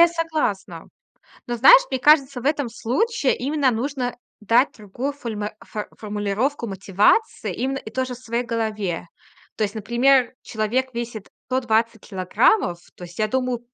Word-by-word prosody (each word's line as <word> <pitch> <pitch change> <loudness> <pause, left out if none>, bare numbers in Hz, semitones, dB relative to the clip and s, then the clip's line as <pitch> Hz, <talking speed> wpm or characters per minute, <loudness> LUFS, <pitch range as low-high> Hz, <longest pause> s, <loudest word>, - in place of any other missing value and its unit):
я 340 - +8
согласна. 310 - -3 0.6
Но, 240 - -2
знаешь, - - +8
мне 260 - -1
кажется, 275 -3 +4
в 260 - -5
этом 290 -4 +1
случае 280 - 0
именно 280 +1 +1
нужно 250 +1 -2 0.2
дать 230 +6 +3
другую 235 +7 -4
фольма 220 -6 -5
фо 210 -1 -6
формулировку 210 +5 -2
мотивации 200 - +1
именно 270 +2 -2
и 220 - -9
тоже 255 +1 -2
в 245 - -12
своей 235 -1 -2
голове. 215 -7 -3 0.5
То 220 - +1
есть 205 +1 -4
например, 240 +4 +3
человек 240 +4 -2
весит 235 -3 -5 0.2
120 230 -3 0
килограммов. 190 - +2 0.2
То 180 - -9
есть 175 +3 -12
я 215 - +1
думаю 255 0 -1
235 Hz, 150 wpm, -22 LUFS, 215-270 Hz, 0.6 s, я